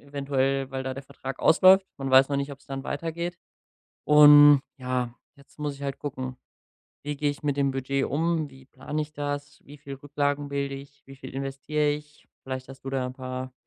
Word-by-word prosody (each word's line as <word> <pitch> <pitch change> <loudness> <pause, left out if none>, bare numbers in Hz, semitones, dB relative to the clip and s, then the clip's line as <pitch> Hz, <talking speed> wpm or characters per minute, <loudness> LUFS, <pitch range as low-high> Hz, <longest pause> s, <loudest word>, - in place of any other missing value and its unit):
eventuell 135 -1 -1
weil 130 0 -3
da 130 - -2
der 135 - -7
Vertrag 135 0 -8
ausläuft, 190 +3 +6
man 135 -1 -3
weiß 130 +1 +7
noch 140 - -1
nicht, 140 +1 -2
ob's 140 0 -14
dann 135 0 -6
weitergeht. 170 +3 -4 0.7
Und, 145 -1 +9 0.2
ja, 125 -2 -2 0.2
jetzt 140 +2 -22
muss 150 -1 -3
ich 140 - -12
halt 140 -1 -3
gucken: 130 -3 -5 0.7
„Wie 145 0 -3
gehe 145 0 +1
ich 145 - -10
mit 145 -1 0
dem 140 -1 +2
Budget 135 +1 -1
um? 160 +1 0
Wie 135 -1 -16
plane 145 +3 -5
ich 150 0 -6
das? 145 -1 -5
Wie 145 +1 -12
viel 140 -1 -8
Rücklagen 145 +1 -2
bilde 140 -1 -2
ich? 140 +1 -12
Wie 135 - -11
viel 130 -1 -10
investiere 135 +2 -1
ich?“ 150 0 -6 0.2
Vielleicht 130 -1 -5
hast 135 - -11
du - - -3
da 130 -1 -1
’n 125 - -7
paar 130 0 -6
140 Hz, 200 wpm, -26 LUFS, 135-145 Hz, 0.7 s, Und